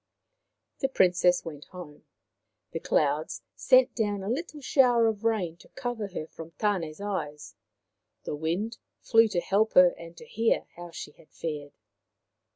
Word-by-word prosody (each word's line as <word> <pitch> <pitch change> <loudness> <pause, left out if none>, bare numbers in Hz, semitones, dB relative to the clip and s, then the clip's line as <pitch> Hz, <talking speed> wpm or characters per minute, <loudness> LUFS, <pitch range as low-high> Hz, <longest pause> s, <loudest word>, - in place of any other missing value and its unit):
' - - -54
The 270 - +1
Princess 180 -6 +3
went 150 -3 -8
home. 165 -5 -11 0.7
The 165 - -3
clouds 150 0 0
sent 255 -1 +4
down 205 -4 -1
a 195 - -3
little 305 +3 -4
shower 250 -4 +4
of 220 -1 0
rain 200 -8 0
to - - -18
cover 245 -5 -3
her 180 -5 -5
from 165 +1 -11
Tane's 185 -7 -1
eyes, 150 -8 -4 0.7
the - - -4
Wind 175 +10 -2 0.2
flew 225 -1 +5
to 195 -5 -1
help 200 +5 +1
her 180 -1 +8
and 170 0 -12
to 235 - -11
hear 225 0 +1
how 175 0 -9
she 165 - -8
had 155 - -22
fared. 145 -3 -5
185 Hz, 160 wpm, -28 LUFS, 165-225 Hz, 0.7 s, her